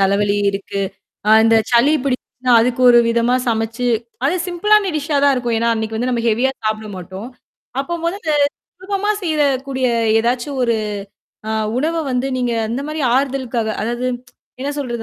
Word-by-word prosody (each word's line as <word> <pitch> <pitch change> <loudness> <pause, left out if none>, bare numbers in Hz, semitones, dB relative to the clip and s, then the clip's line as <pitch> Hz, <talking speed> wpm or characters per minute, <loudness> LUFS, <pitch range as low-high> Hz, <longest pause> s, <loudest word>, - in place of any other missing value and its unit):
தலவலி 200 +1 +2
இருக்கு. 200 0 -4 0.5
அ - - +5
இந்த 225 0 +5 0.2
சலி 240 +6 +5
பிடிச்சுச்னா 255 -1 -1
அதுக்கு 250 +2 0
ஒரு 240 - +7
விதமா 235 +1 +2
சமைச்சு 225 +2 -1 0.4
அது 305 - +1
சிம்பிளான 400 +3 +3
டிஷ்ஷா 295 0 -1
தான் 280 -1 +5
இருக்கும். 240 -2 -1
ஏன்னா, 230 +1 +1
அன்னைக்கு 220 0 -3
வந்து 250 +3 -1
நம்ம 235 -2 -1
ஹெவியா 240 +5 +2
சாப்பிட 215 0 -2
மாட்டோம். 190 +6 -8 0.5
அப்போ 345 +5 -3
மொதல 335 -3 -1 0.5
சுலபமா 400 +2 -1
செய்றக்கூடிய 275 -5 0 0.3
ஏதாச்சும் 250 +3 -1
ஒரு 235 -1 +1 0.7
ஆ - - 0 0.3
உணவ 320 +5 0
வந்து 250 +1 0
நீங்க 245 -1 0 0.2
அந்த 240 +5 -3
மாரி 310 +1 -4 0.2
ஆறுதலுக்காக, 260 -4 -1
அதாவது 240 +3 -2 0.5
என்ன 275 - -2
சொல்றது? 240 -4 -3
250 Hz, 150 wpm, -18 LUFS, 230-285 Hz, 0.7 s, ஒரு